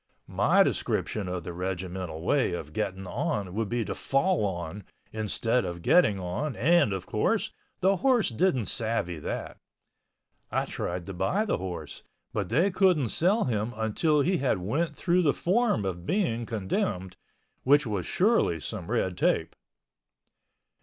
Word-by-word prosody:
My -, -, +4 dB
description 105 Hz, -4 st, -1 dB
of 90 Hz, -1 st, -3 dB
the 85 Hz, -, -6 dB
regimental 90 Hz, -2 st, -4 dB
way 130 Hz, -1 st, +2 dB
of 75 Hz, -3 st, -6 dB
getting 95 Hz, -3 st, -3 dB
on 100 Hz, -, -2 dB
would 110 Hz, 0 st, -2 dB
be 120 Hz, -2 st, -1 dB
to -, -, -3 dB
fall 150 Hz, -, +1 dB
on, 85 Hz, +1 st, -5 dB, 0.3 s
instead 115 Hz, +3 st, 0 dB
of 85 Hz, -1 st, -5 dB
getting 110 Hz, -, +4 dB
on 95 Hz, +11 st, -3 dB
and, 165 Hz, -2 st, +4 dB
of 95 Hz, -2 st, -3 dB
course, -, -, 0 dB, 0.3 s
the 195 Hz, +1 st, +3 dB
horse 250 Hz, -1 st, +3 dB
didn't 130 Hz, -, +1 dB
savvy 110 Hz, -8 st, -2 dB
that. -, -, -5 dB, 0.9 s
I -, -, 0 dB
tried 90 Hz, 0 st, -4 dB
to 95 Hz, -, -6 dB
buy 95 Hz, -, 0 dB
the 210 Hz, -, 0 dB
horse, 85 Hz, -5 st, -6 dB, 0.3 s
but 100 Hz, -4 st, -2 dB
they 165 Hz, -, +3 dB
couldn't 180 Hz, -, +3 dB
sell 195 Hz, -, +2 dB
him 110 Hz, -1 st, -1 dB
until 125 Hz, +8 st, +1 dB
he 180 Hz, +5 st, +2 dB
had 135 Hz, -8 st, +1 dB
went 145 Hz, -, -1 dB
through 180 Hz, +3 st, +2 dB
the 150 Hz, -5 st, +2 dB
form 190 Hz, -, +1 dB
of 85 Hz, -2 st, -3 dB
being 120 Hz, -, 0 dB
condemned, 95 Hz, -, -2 dB, 0.5 s
which 145 Hz, +2 st, +4 dB
was 105 Hz, -5 st, -2 dB
surely 195 Hz, -, +2 dB
some 70 Hz, -, -6 dB
red -, -, 0 dB
tape. -, -, +1 dB
110 Hz, 155 wpm, -28 LUFS, -, 0.9 s, My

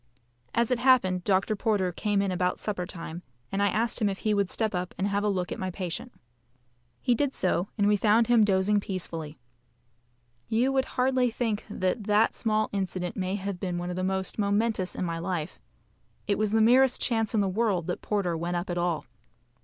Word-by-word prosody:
As 235 Hz, +1 st, +2 dB
it 250 Hz, -, +2 dB
happened, 235 Hz, -9 st, +3 dB
Dr. 195 Hz, +2 st, +1 dB
Porter 200 Hz, -4 st, 0 dB
came 205 Hz, +2 st, 0 dB
in 195 Hz, -, -1 dB
about 180 Hz, 0 st, 0 dB
supper 190 Hz, -4 st, -3 dB
time, 170 Hz, -2 st, -7 dB, 0.3 s
and 195 Hz, -, -1 dB
I 200 Hz, -, +4 dB
asked 230 Hz, +3 st, 0 dB
him 210 Hz, -, +3 dB
if 195 Hz, -, -3 dB
he 215 Hz, +1 st, 0 dB
would 200 Hz, -2 st, +1 dB
step 220 Hz, -2 st, -1 dB
up 180 Hz, 0 st, -3 dB
and 195 Hz, -, 0 dB
have 200 Hz, 0 st, 0 dB
a 210 Hz, -, +2 dB
look 185 Hz, -3 st, -2 dB
at -, -, -4 dB
my 185 Hz, -, -2 dB
patient. 185 Hz, +6 st, -5 dB, 0.9 s
He 245 Hz, -, +2 dB
did 275 Hz, +3 st, 0 dB
so, 180 Hz, 0 st, 0 dB
and 205 Hz, -, +2 dB
we 210 Hz, -, +4 dB
found 215 Hz, +3 st, +4 dB
him 235 Hz, -1 st, +5 dB
dozing 205 Hz, +1 st, +3 dB
peacefully. 165 Hz, -6 st, -5 dB, 1.1 s
You 240 Hz, +4 st, +2 dB
would 265 Hz, -1 st, +1 dB
hardly 255 Hz, -1 st, +3 dB
think 225 Hz, -2 st, -2 dB
that 195 Hz, +2 st, -1 dB
that 210 Hz, +1 st, +3 dB
small 215 Hz, -1 st, 0 dB
incident 185 Hz, -2 st, -2 dB
may 185 Hz, 0 st, -2 dB
have 195 Hz, -2 st, -4 dB
been 180 Hz, -2 st, -2 dB
one 175 Hz, +1 st, -3 dB
of -, -, -4 dB
the 185 Hz, -, -2 dB
most 190 Hz, +2 st, -1 dB
momentous 205 Hz, -1 st, 0 dB
in -, -, -2 dB
my 165 Hz, -1 st, -3 dB
life. 170 Hz, -3 st, -3 dB, 0.7 s
It 205 Hz, -1 st, 0 dB
was 215 Hz, -1 st, +1 dB
the 220 Hz, 0 st, +3 dB
merest 250 Hz, +3 st, +5 dB
chance 225 Hz, -1 st, 0 dB
in 210 Hz, -, +3 dB
the 200 Hz, -, +1 dB
world 190 Hz, -3 st, 0 dB
that 180 Hz, -, -3 dB
Porter 195 Hz, -5 st, -1 dB
went 170 Hz, +2 st, -2 dB
up 175 Hz, +1 st, -2 dB
at 175 Hz, -, -1 dB
all. 175 Hz, -2 st, -1 dB
200 Hz, 210 wpm, -27 LUFS, 180-220 Hz, 1.1 s, him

